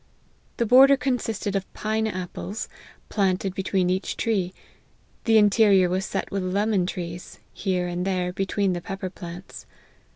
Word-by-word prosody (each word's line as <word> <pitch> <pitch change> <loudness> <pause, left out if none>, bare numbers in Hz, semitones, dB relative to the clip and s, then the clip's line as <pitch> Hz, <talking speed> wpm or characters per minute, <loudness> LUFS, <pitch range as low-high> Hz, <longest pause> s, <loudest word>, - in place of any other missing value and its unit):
The 235 - +1
border 270 +4 +7
consisted 230 -6 -2
of 195 -1 -3
pine 220 +1 -1
apples, 185 +2 -5 0.4
planted 190 -2 0
between 190 -1 0
each 185 +2 -2
tree; 195 -6 0 0.7
the 225 -2 +4
inte* 210 +1 +5
rior 190 -4 +5
was 190 +1 0
set - - -3
with 195 - -1
lemon 195 0 +1
trees, 175 -1 -6 0.2
here 185 -3 -1
and 175 0 -2
there, 180 -2 -1
be 195 +1 -2
tween 200 -2 +1
the 175 - -3
pepper 190 0 -5
plants. 175 0 -9
195 Hz, 155 wpm, -25 LUFS, 180-215 Hz, 0.7 s, border